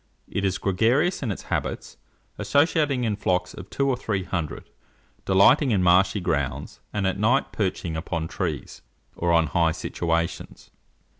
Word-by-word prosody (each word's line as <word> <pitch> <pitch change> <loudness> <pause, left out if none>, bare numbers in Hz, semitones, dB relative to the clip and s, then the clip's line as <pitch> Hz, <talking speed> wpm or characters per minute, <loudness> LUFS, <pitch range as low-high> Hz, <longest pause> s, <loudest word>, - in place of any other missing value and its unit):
It 100 - -3
is 95 -1 0
gregarious 120 - +1
in 120 -6 -2
its 95 - -6
habits, - - -3 0.4
associating 145 -3 +2
in 110 -3 0
flocks 90 -2 -1
of 95 +1 -10
two 140 - 0
or 135 - +2
three 105 -6 -2
hundred, 85 -5 -5 0.5
delighting 120 +9 +5
in 100 -5 +2
marshy 95 +3 +4
grounds, 70 -5 -2
and 105 -2 -2
at 95 +1 -1
night 120 +6 +2
perching 90 -5 -2
upon 80 0 -3
trees, 80 -6 -4 0.3
or 85 0 0
on 85 -1 +4
high 80 +2 +1
situations. 85 0 -3
95 Hz, 150 wpm, -24 LUFS, 85-115 Hz, 0.5 s, delighting